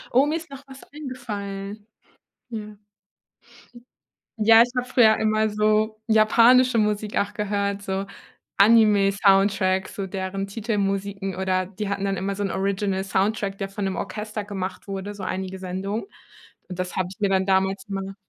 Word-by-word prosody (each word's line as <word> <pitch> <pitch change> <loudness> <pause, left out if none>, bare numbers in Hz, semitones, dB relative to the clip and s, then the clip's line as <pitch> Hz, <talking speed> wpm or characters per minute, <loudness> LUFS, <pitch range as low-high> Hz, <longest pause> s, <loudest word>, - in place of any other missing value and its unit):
Oh, 275 +3 +5
mir 305 - 0
ist 325 - -10
noch 275 0 -10
was 270 0 -12
eingefallen. 210 -7 -6 0.6
Ja 215 -2 -7 1.6
ja, 225 +1 +7
ich 245 - -4
habe 250 0 -1
früher 220 -4 +5
immer 215 0 +1
so 215 +1 +1
japanische 230 +3 +5
Musik 210 0 -1
auch 205 +1 0
gehört, 200 -1 -2
so 195 0 -2 0.5
Anime 210 -2 +5
Soundtrack, 195 -1 +2
so 195 -1 -5
deren 190 +1 -4
Titelmusiken 195 -2 -2
oder 185 0 0
die 205 +2 -5
hatten 200 0 -2
dann 195 -1 -1
immer 195 +2 -2
so 205 - -3
'n 195 - -1
Original 195 0 -1
Soundtrack, 195 +1 -1
der 195 - -3
von 195 0 -4
dem 190 -1 -2
Orchester 210 0 -5
gemacht 195 -1 -6
wurde, 195 +1 -5
so 200 -2 -9
einige 190 0 -4
Sendungen. 190 +4 -4 0.6
Und 180 -1 -7
das 180 -1 -3
hab 185 -1 0
ich 195 - -13
mir 200 -2 +1
dann 190 -1 +2
damals 190 0 +1
immer 195 0 -4
200 Hz, 160 wpm, -24 LUFS, 195-215 Hz, 1.6 s, ja